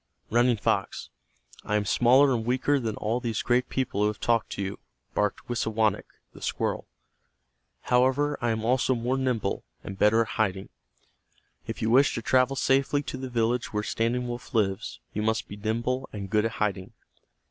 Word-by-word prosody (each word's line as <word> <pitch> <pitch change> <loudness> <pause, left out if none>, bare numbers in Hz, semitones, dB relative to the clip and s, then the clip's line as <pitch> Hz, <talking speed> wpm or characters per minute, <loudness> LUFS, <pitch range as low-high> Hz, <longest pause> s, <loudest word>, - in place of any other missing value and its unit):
"Running 120 +1 +3
Fox, - - -1 0.5
I 105 - -1
am 105 -1 +1
smaller 130 +6 +5
and 115 -2 -1
weaker 130 +4 +1
than 110 -4 -3
all 115 +3 -1
these 115 -3 -2
great 125 +1 +1
people 130 -6 -1
who 105 - +4
have 105 0 -3
talked 115 -1 +1
to - - -4
you," 95 +1 -5 0.3
barked 105 0 -1
Wisawanik, 110 -3 0 0.3
the - - -14
squirrel. - - -2 0.9
"However, 130 +4 +2
I 120 - +1
am 110 -1 -1
also 130 +2 +2
more 120 +2 -1
nimble, 125 -7 -1 0.2
and 95 -1 -8
better 110 +2 +5
at - - -10
hiding. 95 -3 -1 1.0
If - - -5
you 110 - +1
wish 135 +3 +5
to 115 - -4
travel 130 +3 +3
safely 135 +2 +2
to 135 - -5
the 130 0 -5
village 120 0 0
where 105 0 -1
Standing 120 +3 -1
Wolf 120 0 -7
lives, 95 -3 0
you 105 - -2
must 110 +1 0
be 100 - -8
nimble 115 +5 -2
and 100 -2 -7
good 105 0 +3
at 115 - -1
hiding. 100 -4 -2
115 Hz, 180 wpm, -27 LUFS, 105-125 Hz, 1.0 s, smaller